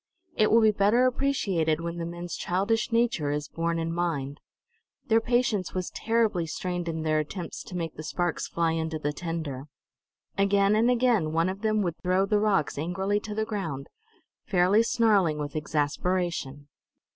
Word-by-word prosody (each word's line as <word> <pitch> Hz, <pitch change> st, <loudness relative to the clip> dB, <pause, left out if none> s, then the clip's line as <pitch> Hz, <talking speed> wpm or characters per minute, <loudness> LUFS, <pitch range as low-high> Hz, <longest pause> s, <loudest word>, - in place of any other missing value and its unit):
It 215 Hz, -, +3 dB
will 230 Hz, +1 st, +5 dB
be 220 Hz, -1 st, +5 dB
better 210 Hz, +5 st, +3 dB
appreciated 200 Hz, -, +1 dB
when 170 Hz, 0 st, -4 dB
the 165 Hz, -, -3 dB
men's 175 Hz, 0 st, -6 dB
childish 200 Hz, +7 st, 0 dB
nature 230 Hz, -10 st, +1 dB
is 145 Hz, 0 st, -2 dB
borne 165 Hz, +1 st, -2 dB
in 165 Hz, 0 st, -2 dB
mind. 150 Hz, -5 st, -2 dB, 0.7 s
Their 225 Hz, 0 st, +3 dB
patience 235 Hz, -6 st, 0 dB
was 185 Hz, -1 st, -2 dB
terribly 225 Hz, -7 st, 0 dB
strained 175 Hz, +1 st, -3 dB
in 160 Hz, -1 st, -3 dB
their 155 Hz, -1 st, +2 dB
attempts 165 Hz, +3 st, -5 dB
to 180 Hz, -, -6 dB
make 165 Hz, -2 st, -3 dB
the -, -, -7 dB
sparks 175 Hz, +2 st, -2 dB
fly 170 Hz, -1 st, 0 dB
into 160 Hz, 0 st, -2 dB
the 150 Hz, -1 st, -2 dB
tinder. 155 Hz, -5 st, -4 dB, 0.7 s
Again 200 Hz, +1 st, +3 dB
and 225 Hz, +3 st, +3 dB
again 235 Hz, -10 st, +2 dB
one 165 Hz, +2 st, +2 dB
of 190 Hz, +2 st, -5 dB
them 215 Hz, -1 st, +1 dB
would 170 Hz, -3 st, -3 dB
throw 185 Hz, +1 st, +2 dB
the 210 Hz, +1 st, +2 dB
rocks 195 Hz, -10 st, +1 dB
angrily 190 Hz, +6 st, -1 dB
to 210 Hz, 0 st, -7 dB
the 220 Hz, 0 st, 0 dB
ground, 165 Hz, -11 st, -4 dB, 0.6 s
fairly 190 Hz, +2 st, +4 dB
snarling 210 Hz, -9 st, +2 dB
with 145 Hz, 0 st, -5 dB
exasperation. 150 Hz, -1 st, -1 dB
180 Hz, 170 wpm, -27 LUFS, 160-210 Hz, 0.7 s, will